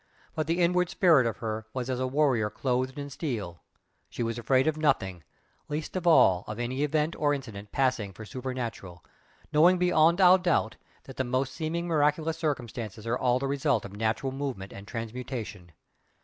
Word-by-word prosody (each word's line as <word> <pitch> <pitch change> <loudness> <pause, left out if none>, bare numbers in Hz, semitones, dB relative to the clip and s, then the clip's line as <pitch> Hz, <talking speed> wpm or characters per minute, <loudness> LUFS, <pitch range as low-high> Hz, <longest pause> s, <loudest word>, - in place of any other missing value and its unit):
But 155 -2 -2
the 165 +2 0
inward 180 0 +2
spirit 160 -10 +4
of 110 - -3
her 110 0 -3
was 125 -2 -2
as 130 -1 -2
a 130 - 0
warrior 130 -6 +2
clothed 130 +3 -2
in 145 0 -6
steel, 105 - -4 0.5
she - - -4
was 115 0 -2
afraid 130 +2 +2
of 155 -1 +1
nothing 95 - 0 0.5
least 150 +3 -4
of 180 -2 -2
all 95 - +5
of 110 - -5
any 125 +3 -2
event 150 +2 0
or 145 -1 +2
incident 105 -7 -8
passing 125 -7 0
for 110 +4 -10
"supernatural," 120 -8 -6 0.5
knowing 170 +5 +6
beyond 175 -1 +3
all 185 0 +7
doubt 175 -11 0 0.3
that 135 - -12
the 130 - +1
most 130 +1 -1
seeming 165 +3 -3
miraculous 160 0 +1
circumstances 120 - -4
are 115 +1 0
all 125 0 +2
the 135 - -3
result 140 -3 0
of 100 - -9
natural 110 +5 -1
movement 130 -8 -5
and 100 +1 -10
transmutation. 115 -5 -6
130 Hz, 175 wpm, -28 LUFS, 110-155 Hz, 0.5 s, all